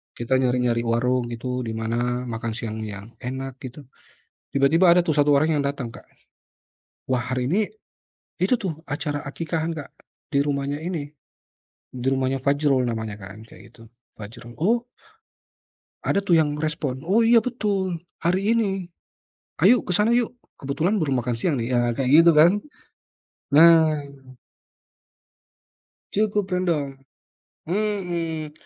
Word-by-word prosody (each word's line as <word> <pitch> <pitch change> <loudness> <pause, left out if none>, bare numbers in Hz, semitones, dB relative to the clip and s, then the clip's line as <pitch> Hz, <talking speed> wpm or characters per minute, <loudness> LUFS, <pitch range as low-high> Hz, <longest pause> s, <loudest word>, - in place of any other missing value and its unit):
Kita 130 +2 0
nyari-nyari 125 -2 +1
warung 120 +1 +1
gitu 125 +2 -4
di 110 - -4
mana 120 +2 -1
makan 115 -2 -4
siang 110 -2 -5
yang 105 +1 -7
enak 130 +1 -6
gitu, 135 +3 -9 0.7
tiba-tiba 160 +6 +4
ada 180 - +6
tuh 170 -3 +1
1 145 0 +3
orang 155 +2 +3
yang 145 - 0
datang 140 -3 -2
Kak. 115 - -12 1.0
Wah 130 -2 0
hari 125 -1 -1
ini 200 +9 +1 0.7
itu, 185 +7 +2
tuh, 190 -10 -3
acara 145 0 -3
aqiqahan 165 +3 -3
Kak, 150 -3 -8 0.4
di 140 - +1
rumahnya 140 0 -1
ini, 160 -3 -4 0.8
di 125 0 -7
rumahnya 135 0 +1
Fajrul 140 -1 +1
namanya, 110 -2 -4
kan, 95 +2 -10
kayak 110 +1 -16
gitu, 115 - -16 0.3
Fajrul, 120 +3 -10
oh 235 +6 +2 1.2
ada, - - +1
tuh, 175 -3 +3
yang 150 -1 -1
respon, 150 -3 -3
"Oh 215 +5 +3
iya 230 +1 +6
betul, 200 -7 -2 0.2
hari 190 +5 +2
ini, 195 -5 -1 0.8
yuk 235 +2 +5
ke - - +2
sana 215 +3 +3
yuk, 240 0 +1 0.2
kebetulan 165 +8 0
baru 140 -4 +1
makan 125 0 -1
siang, 155 +2 +1
nih." 120 +1 -2
Ya, 120 - +3 0.2
kayak 130 -2 -1
gitu, 170 0 +6
kan. 165 +4 +8 1.0
Nah. 160 0 +6 2.1
Cukup 205 -2 0
rendah. 160 -7 -1 0.7
Hmm. 175 -5 -2
145 Hz, 135 wpm, -23 LUFS, 125-175 Hz, 2.1 s, kan